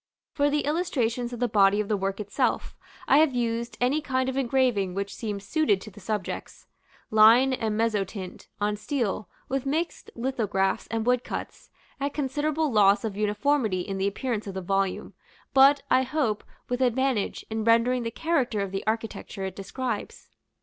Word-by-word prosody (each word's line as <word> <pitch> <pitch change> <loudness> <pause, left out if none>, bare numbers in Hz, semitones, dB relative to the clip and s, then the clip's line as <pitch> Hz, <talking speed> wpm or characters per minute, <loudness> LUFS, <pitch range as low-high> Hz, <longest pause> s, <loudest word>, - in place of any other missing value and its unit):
For 285 -1 +2
the 295 +1 +1
illustrations 250 -7 -1
of 240 - -6
the 245 - +2
body 205 -2 +4
of 210 - -1
the 210 - +1
work 195 0 -2
itself, 205 -1 -1 0.3
I 280 - +6
have 310 -5 +3
used 235 0 -2
any 260 +5 +2
kind 260 -2 0
of 260 - -4
engraving 245 -8 +1
which 200 0 -3
seemed 205 -3 -5
suited 215 -3 +2
to 215 - -10
the 205 - -14
subjects 210 -1 -5 0.5
line 225 +5 +6
and 220 -4 -1
mezzotint, 205 -4 -2
on 210 0 0
steel, 215 -3 -2 0.2
with 270 0 -2
mixed 320 +5 -2
lithographs 215 -6 -1
and 225 -1 -2
woodcuts, 250 0 -2 0.3
at 280 +1 -2
considerable 295 +2 0
loss 205 -1 +4
of 210 -3 -3
uniformity 210 0 +1
in 195 +1 -4
the 195 - +1
appearance 215 +1 -3
of 195 - -6
the 190 - -3
volume, 195 +1 -1 0.4
but, 275 +1 +6
I 255 - +5
hope, 260 -5 -1 0.2
with 245 +1 -2
advantage, 255 -3 0
in 220 0 -1
rendering 230 +3 +3
the 230 - -2
character 255 -5 0
of 195 -1 -3
the 195 0 -3
architecture 220 -3 -3
it 190 -1 -5
describes. 215 +3 -5
230 Hz, 170 wpm, -26 LUFS, 205-265 Hz, 0.5 s, I